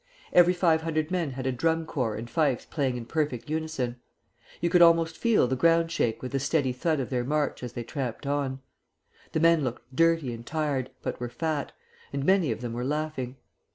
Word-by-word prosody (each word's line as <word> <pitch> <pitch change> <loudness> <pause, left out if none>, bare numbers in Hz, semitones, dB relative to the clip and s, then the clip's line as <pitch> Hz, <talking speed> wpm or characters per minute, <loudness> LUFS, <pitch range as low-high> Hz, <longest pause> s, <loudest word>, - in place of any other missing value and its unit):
Every 180 0 +6
five 165 -3 +3
hundred 155 -1 -1
men 175 -5 0
had 130 0 -5
a 130 - +1
drum 165 +5 0
corps 125 -9 -2
and 115 +2 -6
fifes 145 -2 +1
playing 135 -5 -1
in 120 - -6
perfect 150 -1 -2
unison. 155 -6 -2 0.6
You 170 - +1
could 175 0 +4
almost 165 -1 +5
feel 230 - +3
the 130 - 0
ground 165 +4 +3
shake 115 -8 0
with 130 - -4
the 135 - 0
steady 135 -1 +1
thud 155 +4 0
of 130 - -3
their 125 -2 0
march 150 +3 -1
as 125 -1 -6
they 120 - -4
tramped 130 +1 -4
on. 140 -2 -1 0.7
The - - +1
men 165 -1 +4
looked 125 0 -5
dirty 165 -5 +3
and 115 0 -8
tired, 145 -3 -1
but - - -3
were 120 -1 -3
fat, 155 +1 -2 0.4
and 140 0 -2
many 185 -7 +3
of 110 - -4
them 120 -2 -4
were 120 +1 -3
laughing. 145 -2 -2
145 Hz, 205 wpm, -27 LUFS, 125-165 Hz, 0.7 s, Every